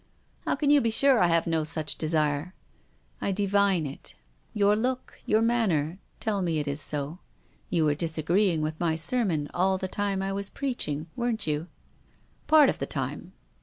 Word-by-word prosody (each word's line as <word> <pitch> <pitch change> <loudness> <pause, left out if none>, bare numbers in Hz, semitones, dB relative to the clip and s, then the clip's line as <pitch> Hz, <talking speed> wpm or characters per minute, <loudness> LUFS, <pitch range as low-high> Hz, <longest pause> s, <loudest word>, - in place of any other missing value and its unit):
" - - -37
How - - +2
can 290 -2 +1
you 290 -1 +6
be 230 - +1
sure 260 +2 +4
I 175 - +5
have 165 -1 +3
no 165 -2 +1
such 155 -1 -2
desire? 155 +1 0 0.2
" - - -37
" - - -37
I - - 0
divine 200 -3 +2
it. 140 - -7 0.4
Your 205 0 +3
look, 255 +4 -3
your 215 +1 +3
manner, 190 -8 +1 0.2
tell 205 -3 -1
me 170 -3 0
it 150 -1 -2
is 140 +1 -2
so. 145 +4 -3 0.5
You 165 -3 +2
were 150 - +3
disagreeing 165 +2 +1
with 155 0 -3
my 170 -2 +1
sermon 165 -4 0
all 190 +2 +2
the 190 - -3
time 195 0 -1
I 195 0 -2
was 200 0 -4
preaching. 205 - -3
Weren't 240 -2 -1
you? 150 +2 -2 0.3
" - - -35
" - - -36
Part 310 -2 +7
of - - -1
the - - -2
time." - - -4
180 Hz, 200 wpm, -27 LUFS, 155-210 Hz, 0.5 s, Part